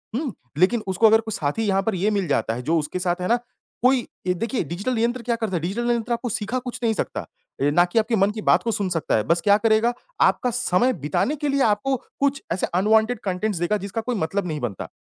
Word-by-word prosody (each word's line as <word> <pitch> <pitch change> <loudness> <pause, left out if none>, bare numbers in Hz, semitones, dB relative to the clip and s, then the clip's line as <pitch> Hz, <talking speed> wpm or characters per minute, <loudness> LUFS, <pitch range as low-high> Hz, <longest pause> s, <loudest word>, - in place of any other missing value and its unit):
हुँ। 265 -2 -2 0.2
लेकिन 210 +7 +3
उसको 190 +4 +4
अगर 220 +1 +5
कोई 220 0 -7
साथी 145 +9 -1
यहाँ 195 -1 +2
पर 220 0 -1
ये 190 +4 +1
मिल 200 -3 0
जाता 140 -5 0
है 125 - -5
जो 165 +5 +1
उसके 155 +4 -4
साथ 180 0 -1
है 180 - -1
ना, 235 - +4 0.5
कोई 255 0 +3 0.2
ये 180 - +3
देखिए 230 +7 -2
डिजिटल 200 - -3
यंत्र 240 +2 0
क्या 235 0 0
करता 220 -5 -3
है, 165 - -1
डिजिटल 225 +8 -2
यंत्र 235 0 -1
आपको 235 +1 -3
सिखा 220 +4 -2
कुछ 250 -1 -6
नहीं 225 -1 +2
सकता - - -3
अ, - - -12 0.5
ना 175 +4 +5
कि 180 +6 +1
आपके 225 +1 +1
मन 200 0 +3
की 215 0 -6
बात - - +3
को 230 - 0
सुन 200 -3 -1
सकता 165 -5 0
है, 105 - +1
बस 170 +1 +1
क्या 200 +4 +5
करेगा? 225 +2 +2 0.3
आपका 250 - +3
समय 245 +1 +2
बिताने 155 - -1
के 295 0 -2
लिए 275 0 +1
आपको 220 +5 +1 0.2
कुछ 280 0 +1
ऐसे 180 - -1
अनवांटेड 220 +5 +3
कंटेंट्स 190 0 -1
देगा 175 +5 +1
जिसका 200 +3 -4
कोई 245 +2 -2
मतलब 190 +1 -1
नहीं 155 -3 -3
बनता, 110 -6 -4
215 Hz, 250 wpm, -23 LUFS, 180-235 Hz, 0.5 s, अगर